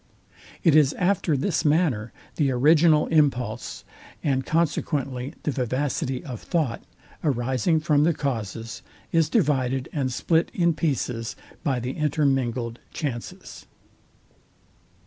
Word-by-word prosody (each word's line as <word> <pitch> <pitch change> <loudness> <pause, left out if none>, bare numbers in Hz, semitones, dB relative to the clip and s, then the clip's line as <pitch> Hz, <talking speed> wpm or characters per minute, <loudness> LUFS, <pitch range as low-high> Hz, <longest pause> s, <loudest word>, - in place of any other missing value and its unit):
It 165 -4 +5
is 150 -2 +5
after 180 -5 +1
this 160 +6 0
manner 145 -8 +1 0.3
the 145 -4 +2
original 155 +4 +4
impulse, 125 -7 0 0.4
and 135 -2 +1
consequently 145 -4 -1
the 150 - 0
vivacity 130 0 -2
of 125 -6 -6
thought, 155 -9 -1 0.4
arising 130 +3 +1
from 150 -2 +3
the 165 0 +2
causes, 115 -5 -4 0.3
is 165 -2 +3
divided 135 - +1
and 135 -4 -1
split 165 +6 +1
in 170 -2 +3
pieces 125 -7 -2 0.3
by 135 -6 0
the 125 +2 -3
intermingled 135 -6 0
chances. 125 -6 -6
140 Hz, 110 wpm, -25 LUFS, 125-155 Hz, 0.4 s, It